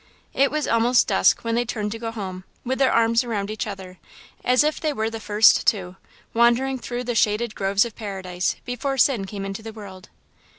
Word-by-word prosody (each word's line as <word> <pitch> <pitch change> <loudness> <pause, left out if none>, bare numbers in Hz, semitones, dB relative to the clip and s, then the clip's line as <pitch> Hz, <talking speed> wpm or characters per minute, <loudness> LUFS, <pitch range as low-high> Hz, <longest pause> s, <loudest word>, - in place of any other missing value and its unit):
It 275 0 +3
was 305 0 -2
almost 235 +2 +3
dusk - - +3
when 230 0 -2
they 240 +1 +1
turned 215 -3 -4
to 225 - -6
go 230 0 -4
home, 190 -5 -6 0.2
with 260 +2 -2
their 265 -1 +4
arms 230 +1 +3
around 210 -4 -3
each 215 - -4
other, 190 -3 -8 0.4
as 250 +3 +4
if 305 0 -1
they 310 - 0
were 220 -3 -2
the 225 - -6
First 215 +1 +4
Two, 185 -4 0 0.4
wandering 240 +3 +2
through 245 +1 -5
the 245 0 -2
shaded 215 0 +1
groves 195 +2 +1
of 230 - -8
Paradise, 190 -4 -3
before 265 +2 -3
sin 240 -7 +3
came 195 0 -6
into 195 +2 -5
the 220 0 -8
world. 195 -4 -11
225 Hz, 205 wpm, -23 LUFS, 200-245 Hz, 0.4 s, their